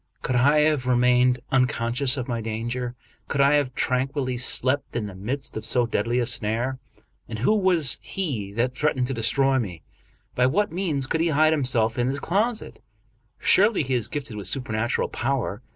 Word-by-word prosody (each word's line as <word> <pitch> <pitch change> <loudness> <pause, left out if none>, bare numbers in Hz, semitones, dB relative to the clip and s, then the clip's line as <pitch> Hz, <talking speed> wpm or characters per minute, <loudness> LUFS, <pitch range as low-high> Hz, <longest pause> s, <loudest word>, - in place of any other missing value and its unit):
Could 125 - -1
I 145 +5 +4
have 150 -4 +1
remained 125 0 +3
un 130 -1 +4
conscious 125 +3 +1
of 125 - -4
my 120 -2 -3
danger? 120 +3 -4 0.3
Could 140 - -3
I 140 +1 +5
have 145 -4 0
tranquilly 130 0 -1
slept 130 +2 +2
in 115 -3 -2
the 100 - -8
midst 125 +9 -4
of 110 - -5
so 120 +2 +2
deadly 115 +1 -1
a 125 - +1
snare? 120 +3 -1 0.5
And 110 - -5
who 130 - +2
was 180 -8 +2
he 130 - -4
that 120 +3 -1
threatened 130 -4 0
to 135 - -3
destroy 135 +3 +2
me? 90 -8 -6 0.5
By 125 0 +2
what 205 +9 0
means 165 -6 -1
could 160 +4 -1
he 170 - +2
hide 155 +1 +3
himself 120 -6 0
in 120 - +1
this 135 +2 -2
closet? 215 +9 -2 0.6
Surely 205 -3 +3
he 130 -1 -3
is 120 -4 0
gifted 135 -7 -6
with 100 -3 -5
supernatural 120 -1 -1
power. 120 -4 -2
130 Hz, 185 wpm, -24 LUFS, 120-145 Hz, 0.6 s, I